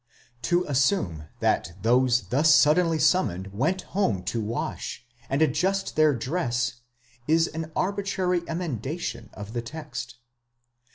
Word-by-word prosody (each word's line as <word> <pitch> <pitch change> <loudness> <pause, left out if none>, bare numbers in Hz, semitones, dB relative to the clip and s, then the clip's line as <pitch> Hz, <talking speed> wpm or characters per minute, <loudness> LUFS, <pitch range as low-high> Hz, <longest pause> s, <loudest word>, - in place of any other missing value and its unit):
'To 175 +4 +2
assume 135 - +1 0.2
that 85 - +1
those 125 +1 +3
thus 150 +5 +4
suddenly 160 +3 +4
summoned 125 - +1
went 160 - 0
home 110 - +1
to 110 +5 -2
wash, 115 +2 -4 0.2
and 140 +4 +2
adjust 195 +4 0
their 155 -1 +5
dress, 120 -3 -1 0.5
is 160 +1 +4
an 160 0 -5
arbitrary 190 -2 0
emendation 145 - -4
of 105 +1 -8
the 120 - -1
text. 130 -3 -7
145 Hz, 120 wpm, -26 LUFS, 120-175 Hz, 0.5 s, their